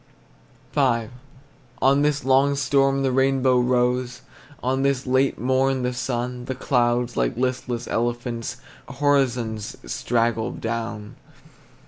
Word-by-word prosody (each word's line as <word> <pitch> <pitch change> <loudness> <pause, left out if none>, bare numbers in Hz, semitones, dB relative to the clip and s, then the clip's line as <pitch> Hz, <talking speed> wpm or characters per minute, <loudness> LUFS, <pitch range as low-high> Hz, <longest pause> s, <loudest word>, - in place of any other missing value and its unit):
V. 120 -6 +1 0.7
On 135 +2 +4
this 145 -1 0
long 135 +2 +4
storm 135 0 +2
the 135 - +1
rainbow 130 -1 +3
rose, 125 0 0 0.4
On 130 +2 0
this 135 -1 0
late 130 +1 +2
morn 130 +1 +1
the 125 0 -1
sun; 125 0 -3
The 130 - -4
clouds, 120 -2 +1
like 120 - 0
listless 125 -1 -2
elephants, 120 0 -2 0.3
Horizons 125 -7 0
straggled 115 - -1
down. 115 -2 -4
125 Hz, 110 wpm, -23 LUFS, 120-135 Hz, 0.7 s, On